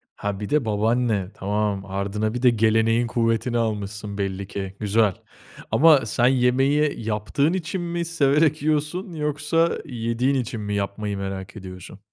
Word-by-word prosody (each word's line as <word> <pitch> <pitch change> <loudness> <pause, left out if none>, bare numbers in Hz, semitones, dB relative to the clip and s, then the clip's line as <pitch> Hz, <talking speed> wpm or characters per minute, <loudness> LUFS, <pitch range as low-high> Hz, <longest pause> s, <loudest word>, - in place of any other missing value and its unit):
Ha, 100 -1 -3
bir 105 - -5
de 150 -4 +2
babaanne. 110 -2 0
Tamam, 100 0 -2
ardına 100 +3 -2
bir 125 - -3
de 125 - +6
geleneğin 115 +1 +2
kuvvetini 115 +1 0
almışsın 105 -2 -3
belli 100 -1 -3
ki. 95 -1 -5
Güzel. 105 -1 +2 0.6
Ama 155 -5 +6
sen 120 +3 +2
yemeği 135 +3 +2
yaptığın 115 - 0
için 185 +1 -3
mi 170 0 -2
severek 155 -1 +2
yiyorsun 155 +5 -1
yoksa 150 +2 0
yediğin 120 0 -1
için 120 -3 -2
mi 105 0 -3
yapmayı 100 +1 -3
merak 95 -1 -5
ediyorsun? 95 -1 -10
115 Hz, 145 wpm, -23 LUFS, 105-145 Hz, 0.6 s, de